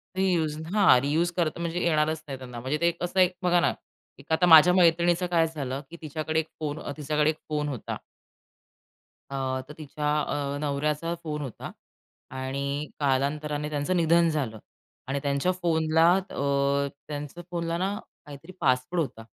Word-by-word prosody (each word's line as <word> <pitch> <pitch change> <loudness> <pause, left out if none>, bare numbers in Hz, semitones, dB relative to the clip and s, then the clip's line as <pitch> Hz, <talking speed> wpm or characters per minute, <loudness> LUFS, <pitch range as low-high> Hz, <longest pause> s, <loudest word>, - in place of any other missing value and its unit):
Reuse 175 -5 +1 0.2
हां, 200 -11 +6
reuse 160 +5 +1
करता 170 -1 0
म्हणजे 170 +1 -2
येणारच 155 -1 +1
नाही 135 -2 -5
त्यांना. 125 -2 -8
म्हणजे 130 +5 -1
ते 170 - +4
एक 170 0 -2
असं 175 +2 -1
एक 180 0 +5
बघा 175 -1 +4
ना, - - +2 0.5
एक - - -14
आता 170 +3 +4
माझ्या 165 +1 +9
मैत्रिणीचं 175 0 +4
काय 165 -2 +4
झालं 140 -4 -4
की 170 - -10
तिच्याकडे 155 +1 -2
एक 160 - -3
फोन 155 -1 -3
अ, - - -5
तिच्याकडे 150 0 +1
एक 155 - -1
फोन 150 -1 -1
होता. 130 -6 -5 1.3
अ, 140 - -4 0.3
तर 150 - -9
तिच्या 150 -1 -3
अ, 145 -1 -2
नवऱ्याचा 150 +3 -1
फोन 150 -2 -3
होता. 135 -6 -7 0.6
आणि 140 +3 -3
कालांतराने 145 +2 0
त्यांचं 150 +4 -1
निधन 170 0 +4
झालं. 135 -9 -2 0.5
आणि 140 +1 -1
त्यांच्या 140 +5 +1
फोनला 160 -1 +3
अ, 140 -6 0 0.2
त्यांचं 150 +3 -6
फोनला 170 -1 -2
ना 190 +3 -1 0.3
काहीतरी 145 +4 -11
पासवर्ड 130 +7 +1
होता. 125 -7 -5
155 Hz, 160 wpm, -27 LUFS, 140-170 Hz, 1.3 s, माझ्या